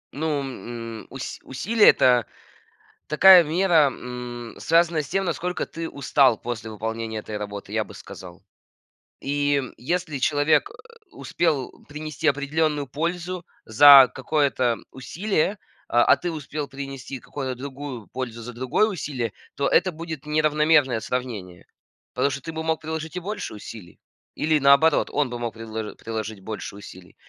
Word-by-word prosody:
Ну, 150 -1 -1
м, 115 -4 -7
ус 135 0 -7
усилие- 210 - +3
это 125 -2 +4 0.8
такая 180 +3 +8
мера, 165 -1 +3
м, 125 -2 -7
связанная 165 -1 +2
с 140 - -10
тем, 195 +3 0
насколько 180 +1 -2
ты 165 0 -6
устал 135 -3 +3
после 115 -2 -6
выполнения 110 +1 -4
этой 105 0 -7
работы, 100 -1 -6
я - - +1
бы - - -13
сказал. 90 -1 -11 0.8
И 145 0 0 0.2
если 155 +2 -2
человек, 145 +2 +2
а, - - -14 0.4
успел 155 -7 -1 0.2
принести 155 +1 -4
определённую 145 +1 +1
пользу 170 +5 -3 0.2
за 135 +3 +9
какое-то 130 -4 +1
усилие, 190 +7 -1 0.3
а 120 0 +5
ты 175 - -4
успел 150 -1 -5
принести 135 -1 -7
какую-то 130 -1 -5
другую 135 -3 -7
пользу 120 -3 -6
за 125 +2 -8
другое 130 - +1
усилие, 140 - -3 0.2
то 140 - 0
это 180 +2 +3
будет 160 -2 -7
неравномерное 150 -4 +3
сравнение. 110 -8 -5 0.5
Потому 130 +3 +1
что 135 0 -5
ты 165 - -6
бы 160 0 -4
мог 160 -1 -1
приложить 160 0 -5
и 180 - -2
больше 205 +4 -5
усилий, 105 -3 -11 0.4
или, 155 0 +2
наоборот, 140 +3 +4
он 145 -3 0
бы 120 - -5
мог 120 -1 -4
предло 110 -1 -6
приложить 110 -2 -5
больше 100 0 -7
усилий. 95 -3 -13
140 Hz, 145 wpm, -24 LUFS, 120-160 Hz, 0.8 s, за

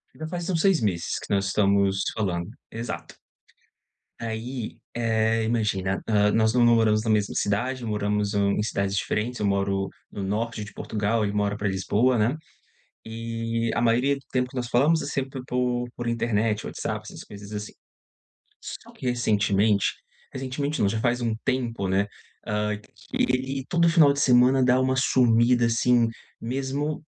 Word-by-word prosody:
Já 155 +1 -6
faz 175 0 -4
uns 165 -3 +1
6 195 -2 +4
meses 95 -7 -1
que - - -4
nós 100 -1 +1
estamos 100 0 +3 0.2
nos - - -2
falando. 95 -3 -2 0.2
Exato. 85 -9 -6 1.0
Aí, 115 +1 -5 0.2
eh, 115 -1 +1
imagina, 105 -5 0
hã, 105 -1 +3
nós 110 0 +3
não 125 -1 +4
não 120 0 +6
moramos 110 -1 +3
na 110 - -2
mesma 105 -2 +2
cidade. 120 +6 -1
Moramos, 105 -1 -1
hã, 100 -1 +2
em 105 - 0
cidades 100 -2 -1
diferentes. 115 +5 -2
Eu 105 - 0
moro 100 0 0 0.2
no 100 - -5
norte 110 +2 -2
de 105 - -10
Portugal. 110 +1 -1
Ele 100 - -1
mora 105 0 0
para 105 - -1
Lisboa, 105 +6 +1
né. 120 +8 +1 0.7
E 115 0 -3
a - - 0
maioria 120 +4 +3
do 140 - -12
tempo 125 -1 0
que 130 - -12
nós 120 -1 -2
falamos 150 +7 +3
é - - -4
sempre 135 -2 -3
por 125 -1 -1
por 120 - -5
internet, 110 -2 0
WhatsApp, - - -4
essas - - -9
coisas 100 0 -11
assim. 105 0 -5 0.9
Só - - -9
que, - - -10
recentemente, 105 -3 +2 0.4
recentemente 135 +2 -3
não, 100 - +3
já 110 +2 -1
faz 120 +1 +1
um 115 -2 0
tempo, 120 -6 -1
né, 100 +2 +1 0.4
hã, 105 0 -1
que 105 - -10
ele 130 +1 0
todo 170 -1 +3
final 160 -4 +6
de 140 - -2
semana 130 0 +5
dá 125 0 +4
uma 130 0 +1
sumida, 120 -2 +4
assim, 120 0 +3 0.3
mesmo 135 +5 -2
115 Hz, 170 wpm, -25 LUFS, 105-125 Hz, 1.0 s, não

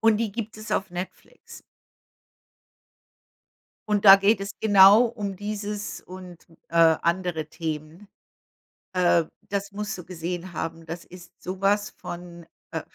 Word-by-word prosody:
Und 225 -1 +4
die 220 -3 -2
gibt 220 -1 -5
es 215 +1 -9
auf 190 -1 -1
Netflix. 180 +1 -9 2.3
Und 210 -1 +1
da 195 -1 +11
geht 200 +1 +2
es 200 +1 -4
genau 205 +1 +7
um 205 -4 -5
dieses 205 +1 -5
und, 180 -2 -12 0.2
äh, - - -13 0.3
andere 170 -2 -1
Themen. 160 +3 -6 0.9
Äh, 175 -2 +3 0.3
das 200 0 -3
musst 210 0 -4
du 175 - -10
gesehen 175 0 -5
haben. 165 +1 -5
Das 170 +1 -7
ist 180 -1 -14
sowas 195 +3 0
von, 175 -1 -9 0.2
äh - - -3
190 Hz, 130 wpm, -25 LUFS, 175-205 Hz, 2.3 s, da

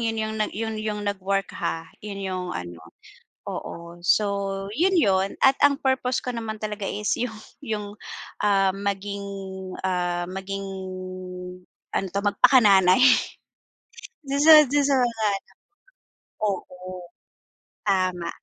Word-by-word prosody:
yun 225 -1 -1
yung 220 0 -2 0.2
yun 220 +1 -3
yung 215 -1 -3
nag-work 195 -1 -1
ha, 165 0 -3 0.2
yun 205 -1 -6
yung 185 -1 -3
ano, 85 -2 -6 0.7
oo. 170 +1 -7
So, 195 -1 +1
yun, 365 +5 +3
yun, 195 - +2
at 270 - +6
ang 285 -1 +5
purpose 260 -1 +1
ko 250 -1 -4
naman 225 -2 -4
talaga 210 -1 -4
is 210 0 -1
yung 235 -2 -3 0.3
yung 210 -2 -3 0.6
ah, 195 -2 +3
maging, 200 0 -3 0.6
ah, 175 -1 0
maging, 195 +1 -5 1.3
ano 195 - 0
'to, 200 - 0
magpakananay, 200 -3 +5 1.2
dun 280 -1 -2
sa 310 0 +10
'dun 285 +2 +2
sa 280 -1 +3
mga 230 -3 0
anak. 195 - -4 1.0
Oo, 185 -2 -5 0.8
tama, 185 -3 +1
200 Hz, 120 wpm, -25 LUFS, 190-225 Hz, 1.3 s, sa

